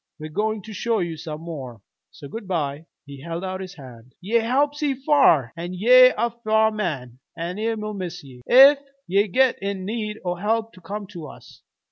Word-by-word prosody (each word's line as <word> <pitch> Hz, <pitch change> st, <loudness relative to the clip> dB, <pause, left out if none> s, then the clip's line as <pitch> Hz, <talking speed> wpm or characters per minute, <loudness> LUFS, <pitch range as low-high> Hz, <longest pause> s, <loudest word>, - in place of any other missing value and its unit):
We're 155 Hz, 0 st, -8 dB
goin' 215 Hz, +3 st, -1 dB
to 220 Hz, -, -9 dB
show 230 Hz, +3 st, 0 dB
you 170 Hz, -4 st, -2 dB
some 155 Hz, 0 st, -7 dB
more. 135 Hz, -9 st, -7 dB, 0.3 s
So 140 Hz, -, -12 dB
good 210 Hz, +6 st, -8 dB
by." 155 Hz, -3 st, -3 dB, 0.2 s
He 140 Hz, -2 st, -11 dB
held 170 Hz, +3 st, -5 dB
out 185 Hz, 0 st, -4 dB
his 190 Hz, +1 st, -8 dB
hand. 125 Hz, -3 st, -14 dB
"Ye 210 Hz, +6 st, +1 dB
helped 275 Hz, +6 st, +1 dB
see 295 Hz, -3 st, 0 dB
f'ar, 265 Hz, -, +3 dB
an' 175 Hz, +2 st, -6 dB
ye're 255 Hz, +6 st, +7 dB
a 235 Hz, +2 st, 0 dB
f'ar 220 Hz, -1 st, +2 dB
man, 140 Hz, -, -4 dB, 0.2 s
an' 170 Hz, +3 st, -4 dB
we'll 215 Hz, -1 st, -2 dB
miss 180 Hz, -3 st, -6 dB
ye. 130 Hz, -3 st, -14 dB
Ef 275 Hz, +3 st, +8 dB, 0.3 s
ye 200 Hz, +3 st, +2 dB
git 255 Hz, +6 st, +2 dB
in 195 Hz, -1 st, -3 dB
need 215 Hz, 0 st, -3 dB
o' 175 Hz, -, 0 dB
help 220 Hz, +5 st, -1 dB
come 205 Hz, +4 st, -6 dB
to 170 Hz, -5 st, -8 dB
us. -, -, -15 dB
195 Hz, 190 wpm, -23 LUFS, 165-225 Hz, 0.3 s, Ef